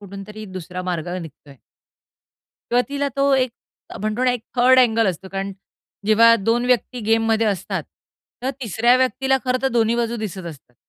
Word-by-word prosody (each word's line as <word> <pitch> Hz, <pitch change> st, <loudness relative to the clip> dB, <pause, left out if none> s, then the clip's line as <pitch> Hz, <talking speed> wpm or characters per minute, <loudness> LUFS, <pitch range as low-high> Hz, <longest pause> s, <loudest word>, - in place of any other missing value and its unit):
कुठूनतरी 200 Hz, +2 st, -9 dB
दुसरा 180 Hz, 0 st, -6 dB
मार्ग 175 Hz, -2 st, -3 dB
निघतोय." 145 Hz, -3 st, -13 dB, 1.1 s
तेव्हा 245 Hz, +1 st, +3 dB
तिला 285 Hz, 0 st, -1 dB
तो 275 Hz, 0 st, +3 dB
एक 255 Hz, -1 st, +1 dB, 0.5 s
म्हणतो 215 Hz, +4 st, -1 dB
ना, 250 Hz, -, +4 dB
एक 245 Hz, -2 st, -2 dB, 0.2 s
थर्ड 255 Hz, +1 st, +6 dB
अँगल 230 Hz, -3 st, +4 dB
असतो, 190 Hz, +1 st, -3 dB
कारण 195 Hz, +1 st, -4 dB, 0.5 s
जेव्हा 230 Hz, +2 st, +6 dB
2 235 Hz, +2 st, +2 dB
व्यक्ती 250 Hz, 0 st, 0 dB
गेममध्ये 225 Hz, 0 st, +2 dB
असतात, 195 Hz, -3 st, -2 dB
तेव्हा 255 Hz, +2 st, -10 dB
तिसऱ्या 235 Hz, +3 st, +3 dB
व्यक्तीला 265 Hz, +1 st, +1 dB
खरं 255 Hz, 0 st, 0 dB
तर 265 Hz, -, +3 dB
दोन्ही 225 Hz, +1 st, +2 dB
बाजू 235 Hz, 0 st, -1 dB
दिसत 190 Hz, -5 st, -5 dB
असतात 140 Hz, -6 st, -11 dB
225 Hz, 160 wpm, -21 LUFS, 195-250 Hz, 1.1 s, थर्ड